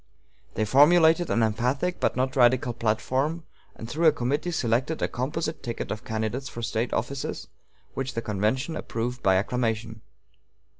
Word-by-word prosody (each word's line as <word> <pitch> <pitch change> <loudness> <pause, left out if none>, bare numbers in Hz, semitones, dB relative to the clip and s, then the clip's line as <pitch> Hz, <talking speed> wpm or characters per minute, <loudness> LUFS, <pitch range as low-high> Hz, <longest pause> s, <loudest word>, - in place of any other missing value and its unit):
They 110 - +1
formulated 160 +7 +5
an 115 - +2
emphatic 125 +11 0
but - - +1
not 130 +1 -1
radical 125 -1 +3
platform, 130 +8 -1 0.3
and 110 - -8
through 160 +7 +2
a - - +8
committee 145 +4 -1
selected 130 0 0
a - - +1
composite 155 +5 -3
ticket 120 -3 -5
of 105 - -4
candidates 110 +5 -3
for 120 - -7
State 110 +3 -1
offices, 140 -1 -3 0.5
which 135 0 -4
the 115 - -1
convention 110 - -1
approved 125 +2 -4
by 95 -1 +4
acclamation. 110 +1 -1
125 Hz, 150 wpm, -26 LUFS, 115-145 Hz, 0.5 s, a